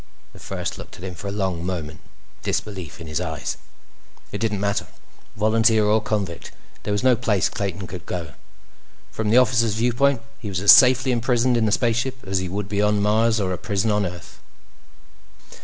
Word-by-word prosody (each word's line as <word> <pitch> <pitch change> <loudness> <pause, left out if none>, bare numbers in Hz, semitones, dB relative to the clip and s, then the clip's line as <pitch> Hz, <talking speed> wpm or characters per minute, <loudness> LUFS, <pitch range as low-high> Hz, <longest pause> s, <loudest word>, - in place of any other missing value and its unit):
The - - -14
First - - -5
looked - - -10
at 85 - -12
him 95 -1 -5
for 95 +4 -8
a - - -3
long 95 -4 -2
moment, 80 -4 -4 0.4
disbelief 95 -8 -4
in 85 - -8
his 75 +2 -3
eyes. 80 -4 -4 0.7
It 100 - -4
didn't 105 -2 -1
matter. 100 0 -1 0.5
Volunteer 110 +1 +3
or 110 +1 +3
convict, 100 -6 -3 0.3
there - - -4
was 105 +3 -1
no 130 -1 +5
place 105 -4 +1
Clayton 100 -4 -4
could 90 -1 -9
go. 85 -6 -5 0.8
From 110 -1 -2
the 115 - +5
officer's 115 -4 +3
viewpoint, 125 +2 +1 0.2
he 105 - -6
was 95 -2 -2
as 100 +1 +8
safely 130 0 +6
imprisoned 120 +1 +2
in 115 -2 +2
the - - +1
spaceship 120 +2 0
as 95 0 0
he 95 -1 -3
would 100 +1 -3
be 100 0 -1
on 105 0 +2
Mars 110 +2 +2
or 95 -2 -1
a 90 - -5
prison 105 +2 0
on 105 -2 +1
Earth. 90 -1 -10
105 Hz, 190 wpm, -22 LUFS, 95-115 Hz, 0.8 s, as